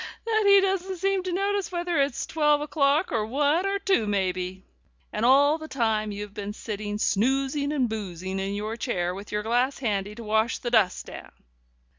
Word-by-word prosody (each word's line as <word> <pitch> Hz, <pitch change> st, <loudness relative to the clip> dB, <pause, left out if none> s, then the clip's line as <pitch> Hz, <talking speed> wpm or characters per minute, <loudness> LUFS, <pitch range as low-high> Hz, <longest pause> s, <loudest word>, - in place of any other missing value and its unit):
that 435 Hz, -2 st, +1 dB
he 400 Hz, 0 st, +8 dB
doesn't 380 Hz, -1 st, -1 dB
seem 390 Hz, +2 st, +1 dB
to 365 Hz, 0 st, -4 dB
notice 395 Hz, +1 st, -1 dB
whether 345 Hz, -3 st, 0 dB
it's 275 Hz, -3 st, -1 dB
twelve 300 Hz, -2 st, +2 dB
o'clock 295 Hz, +2 st, +1 dB
or 225 Hz, -2 st, 0 dB
one 290 Hz, -, +1 dB
or 395 Hz, 0 st, 0 dB
two, 385 Hz, -, +1 dB
maybe!' 185 Hz, -2 st, -2 dB, 0.5 s
And 210 Hz, -, -2 dB
all 285 Hz, +5 st, +5 dB
the 315 Hz, -, -8 dB
time 220 Hz, -6 st, 0 dB
you've 205 Hz, 0 st, -6 dB
been 205 Hz, -1 st, -5 dB
sitting 210 Hz, -1 st, -5 dB
snoozing 270 Hz, +7 st, +1 dB
and 270 Hz, -5 st, +1 dB
boozing 190 Hz, -3 st, -5 dB
in 195 Hz, +1 st, -2 dB
your 215 Hz, +2 st, -3 dB
chair, 180 Hz, -8 st, -1 dB
with 200 Hz, +2 st, -9 dB
your 210 Hz, 0 st, -1 dB
glass 245 Hz, +5 st, +1 dB
handy 210 Hz, -4 st, -2 dB
to 235 Hz, -, -8 dB
wash 220 Hz, +2 st, +1 dB
the 240 Hz, -, -4 dB
dust 215 Hz, -6 st, +2 dB
down." -, -, -10 dB
240 Hz, 185 wpm, -26 LUFS, 210-315 Hz, 0.5 s, he